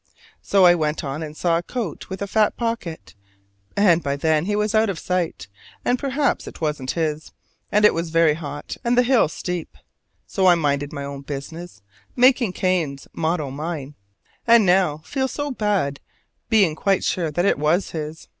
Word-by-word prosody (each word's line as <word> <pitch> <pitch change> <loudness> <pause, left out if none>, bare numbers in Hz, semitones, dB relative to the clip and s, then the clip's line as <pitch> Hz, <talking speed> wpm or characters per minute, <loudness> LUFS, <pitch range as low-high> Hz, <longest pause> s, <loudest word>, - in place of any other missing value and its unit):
So 195 -2 +4
I 175 - +8
went 155 -2 -1
on 140 +2 -4
and 155 -1 -7
saw 170 -1 +2
a - - -4
coat 215 - -5
with 190 +1 -4
a - - -4
fat 215 +1 +2
pocket: 230 -9 -4 0.6
and 180 -5 +4
by 140 -2 -1
then 155 +2 +1
he 205 +1 0
was 210 0 0
out 220 0 +3
of 190 - -3
sight, 180 - -2 0.4
and 245 0 +2
perhaps 280 +1 0
it - - -9
wasn't 150 -5 -2
his; 155 -2 -2 0.4
and 210 +1 +4
it - - +6
was 165 0 -2
very 165 -1 +4
hot 145 -2 -7
and 240 +1 +1
the 245 - +6
hill 250 -5 +4
steep. 175 +1 -5 0.5
So 190 -1 +1
I 175 - +7
minded 145 -3 -1
my 140 -2 -5
own 140 0 -6
business, 145 - -8 0.3
making 250 -5 +4
Cain's 170 -9 -1
motto 160 -4 -1
mine; 150 -1 -5 0.5
and 230 -2 +6
now 180 -5 +2
feel 265 -2 -1
so 290 0 -4
had, 195 -10 0 0.5
being 200 -8 +4
quite 195 +3 +1
sure 170 -3 0
that 175 +5 0
it 200 - +2
was 155 +6 +1
his. 155 0 -6
170 Hz, 185 wpm, -22 LUFS, 150-205 Hz, 0.6 s, I